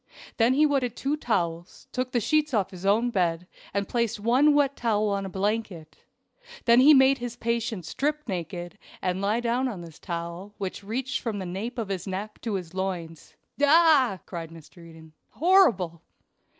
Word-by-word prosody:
Then 235 +3 +3
he 305 +2 +5
wetted 265 -5 0
two 280 +2 -1
towels, 175 - -3
took 255 0 -3
the 245 - +1
sheets 300 +3 +1
off 195 -2 0
his 185 +1 -6
own 230 +4 +3
bed, 175 -4 0 0.3
and 200 0 -2
placed 235 -2 -1
one 260 +7 +4
wet 280 -1 +2
towel 215 -3 0
on 200 -1 -2
a - - -6
blanket; 195 -4 -3 0.7
then 235 0 +6
he 280 +4 +8
made 270 -1 +6
his 240 -1 -5
patient 230 -5 -2
strip 300 - -2
naked, 175 -2 -5 0.2
and 185 +1 -2
lie 210 +4 +1
down 240 +2 0
on 205 -8 -5
this 165 -2 -12
towel, 170 +3 -6
which 195 0 -5
reached 255 +6 -3
from 225 -4 -3
the 190 - -4
nape 200 +8 -5
of 220 -4 -3
his 195 -1 -4
neck 200 +3 -5
to 225 -4 -2
his 180 -3 -5
loins. 180 -4 -5 0.3
"Ah!" 290 - +5
cried 165 -3 -6
Mr. 165 +1 -14
Eden, 160 -1 -14 0.2
"horrible!" 240 - +3
210 Hz, 175 wpm, -26 LUFS, 180-250 Hz, 0.7 s, he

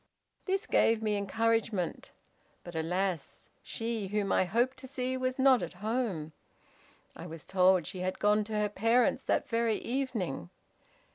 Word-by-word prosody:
This 390 +2 0
gave 225 - +3
me 210 -1 +1
encouragement, 220 -2 0 0.5
but 175 - -9
alas! 175 +1 -2
she 225 -3 -3
whom 200 0 -1
I - - +3
hoped 235 +8 +1
to 260 - -9
see 255 -1 -2
was 255 0 -1
not 265 -2 +5
at 175 - -5
home. 205 -6 -2 0.8
I 170 - -8
was 165 -2 -9
told 185 -2 +4
she 185 - -6
had 185 +1 -2
gone 210 +1 +3
to 220 - -7
her 210 0 +1
parents 230 +4 +2
that - - +1
very 230 -1 +1
evening. 220 - -3
210 Hz, 150 wpm, -31 LUFS, 185-240 Hz, 0.8 s, not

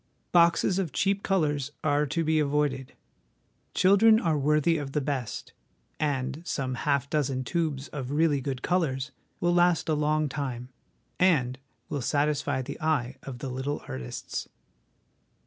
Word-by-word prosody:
Boxes 170 +2 +4
of 175 -6 -2
cheap 195 +5 +1
colours 150 -8 0
are 145 0 +2
to 165 +5 -1
be 160 0 +2
avoided. 145 -3 0 0.8
Children 215 +4 +6
are 165 -7 +1
worthy 150 +3 +2
of 140 -2 -6
the 150 - +2
best, 135 -5 -4 0.5
and 140 0 -1
some 135 -6 -2
half 140 +1 0
dozen 135 -3 0
tubes 145 -2 -2
of 135 -4 -5
really 145 -1 +2
good 130 -1 -4
colours 150 -6 0 0.3
will 175 0 +2
last 175 -1 +3
a - - +3
long 150 0 +1
time, 130 -3 -4 0.5
and 130 -9 +3 0.3
will 145 - -3
satisfy 145 0 0
the 140 +5 -7
eye 145 -6 0
of 135 -3 -7
the 135 +1 -5
little 130 +3 -3
artists. 65 -2 -5
145 Hz, 145 wpm, -27 LUFS, 135-160 Hz, 0.8 s, Children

